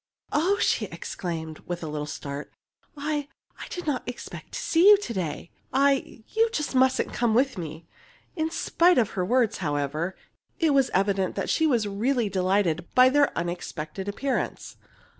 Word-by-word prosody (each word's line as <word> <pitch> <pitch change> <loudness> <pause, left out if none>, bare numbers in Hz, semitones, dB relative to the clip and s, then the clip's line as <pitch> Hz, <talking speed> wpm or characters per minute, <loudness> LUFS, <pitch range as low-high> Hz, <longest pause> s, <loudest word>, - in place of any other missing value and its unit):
"Oh!" 360 +7 +2
she - - +1
exclaimed, 160 -3 -5
with 175 -1 -4
a - - -3
little 150 -1 -4
start; 140 0 -6 0.5
"I 295 0 -2 0.3
I - - -7
did 355 - -6
not 285 -5 0
expect 245 - -9
to - - -3
see 340 +5 +5
you 415 - +9
to 395 - -5
day. 170 -4 -4 0.2
I 275 -3 +1
you 455 +1 +2 0.2
mustn't 260 0 +2
come 235 -2 +1
with 260 +1 +3
me!" 160 -2 -7 0.5
In 320 -2 0
spite 345 +2 +3
of 225 -4 +2
her 185 - -1
words, 235 +3 +2
however, 150 +2 -2 0.4
it 320 -3 +2
was 270 -2 +3
evident 195 -1 +1
that - - -1
she 320 - +3
was 235 -7 +2
really 225 +3 0
delighted 185 -3 +1
by 255 0 +8
their 285 +1 +3
unexpected 175 +1 -4
appearance. 265 +7 -3
220 Hz, 160 wpm, -26 LUFS, 175-275 Hz, 0.5 s, you